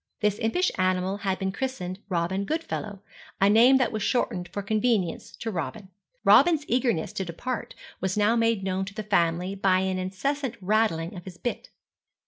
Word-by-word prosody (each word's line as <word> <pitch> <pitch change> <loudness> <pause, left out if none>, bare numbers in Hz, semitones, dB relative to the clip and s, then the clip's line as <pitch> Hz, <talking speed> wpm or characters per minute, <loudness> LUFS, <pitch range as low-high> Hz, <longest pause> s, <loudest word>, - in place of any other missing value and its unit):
This 210 -1 +1
impish 300 +12 +1
animal 185 +1 +1
had 195 -2 -1
been 190 -1 -2
christened 195 -6 -4
Robin 180 +2 0
Goodfellow, 215 -8 -4 0.4
a 195 +1 +5
name 240 +5 +7
that 255 - +1
was 215 -2 -3
shortened 185 -6 0
for 200 - -5
convenience 215 -3 0
to 225 - -4
Robin. 180 +3 -5 0.4
Robin's 320 -4 +6
eagerness 240 -9 0
to 190 - -2
depart 200 +8 -5 0.2
was 190 +1 -2
now 210 +2 +3
made 230 -3 +2
known 190 0 -1
to 200 +1 -10
the 215 - -4
family 180 -2 +1
by 190 -1 +2
an 190 -1 -1
incessant 250 +8 -2
rattling 190 -4 +1
of 175 - -9
his 180 -2 -9
bit. 240 - -4
200 Hz, 170 wpm, -26 LUFS, 185-230 Hz, 0.4 s, name